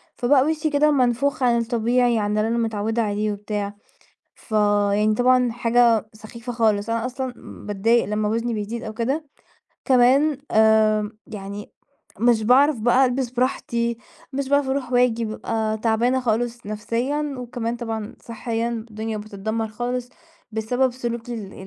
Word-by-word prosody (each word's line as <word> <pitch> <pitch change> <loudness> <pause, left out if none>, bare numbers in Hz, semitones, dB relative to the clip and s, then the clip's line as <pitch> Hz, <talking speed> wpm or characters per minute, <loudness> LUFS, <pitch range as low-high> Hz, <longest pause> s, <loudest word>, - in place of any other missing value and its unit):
فبقى 260 +2 +3
وشي 310 0 0
كده 300 +1 +3
منفوخ 260 0 +1
عن 240 -1 +4
الطبيعي 235 +1 +1
عن 210 0 -1
اللي 215 - +1
أنا 230 +1 0
متعودة 225 0 -1
عليه 210 0 -1
وبتاع، 205 0 -4 0.6
فيعني 210 -1 +1
طبعًا 250 0 +3
حاجة 235 -2 +3
سخيفة 230 +3 -9
خالص، 220 -2 +1
أنا 230 +1 0
أصلًا 255 0 -4 0.3
باتضايق 220 +4 +2
لمّا 210 +2 -1
وزني 230 +2 -1
بيزيد 220 +2 -4
أو 220 - -5
كده، 265 +8 -2 0.6
كمان 265 +3 +4
آمم، 215 -1 +3
يعني 200 0 -8 0.5
مش 235 -1 +3
باعرف 255 +3 +4
بقى 245 +4 +4
ألبس 250 -1 -1
براحتي 235 -2 -1 0.4
مش 270 0 -2
باعرف 285 -1 +2
أروح 265 -2 -2
وآجي، 245 -2 +3
ببقى 220 0 -2
تعبانة 235 +3 +1
خالص 240 -1 -1
نفسيًا 250 +8 -2
وكمان 240 -1 -4
طبعًا 225 -2 -5
صِحيًا 230 0 -3 0.2
الدنيا 215 0 -4
بتتدمر 215 +2 -4
خالص، 245 +2 -3 0.4
بسبب 245 +4 0
سلوكي 240 -1 -4
ال 200 -4 -7
230 Hz, 140 wpm, -23 LUFS, 215-250 Hz, 0.6 s, عن